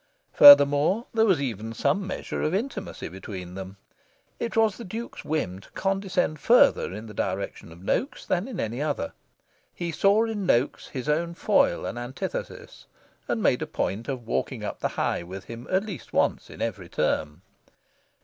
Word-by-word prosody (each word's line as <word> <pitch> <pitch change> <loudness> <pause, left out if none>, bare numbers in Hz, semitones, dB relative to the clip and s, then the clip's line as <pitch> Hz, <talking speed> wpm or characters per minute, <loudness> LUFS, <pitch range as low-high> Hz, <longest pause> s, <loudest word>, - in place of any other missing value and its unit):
Furthermore, 145 - +8
there 225 0 +3
was 185 -7 +4
even 115 -5 -4
some 195 - 0
measure 185 - -4
of 155 +4 0
intimacy 215 -2 -4
between 90 0 -8
them. 95 +1 -8 0.6
It 230 -1 -3
was 220 -2 +4
the 235 - -7
Duke's 225 +5 -7
whim 145 -12 -2
to - - -17
condescend 195 -5 -1
further 245 - +4
in 105 +4 -7
the 105 - -10
direction 95 -3 -3
of 85 +3 -14
Noaks 260 - -1
than 185 +5 0
in 235 -9 -6
any 115 +4 -2
other. 145 - -2 0.6
He 170 -1 -3
saw 200 +7 +3
in 210 -4 -3
Noaks 125 -1 +1
his 130 -1 -6
own 170 +3 0
foil - - +2
and 120 - -4
antithesis, 120 +2 -6 0.4
and - - -1
made - - +3
a - - -2
point 105 +5 -3
of 130 -4 -4
walking 65 - -2
up - - -5
the - - 0
High - - -1
with 95 +3 -8
him 115 +1 -9
at 190 +2 +1
least 190 - -8
once - - +1
in - - -6
every - - -4
term. 75 +4 -1
145 Hz, 175 wpm, -26 LUFS, -, 0.6 s, Furthermore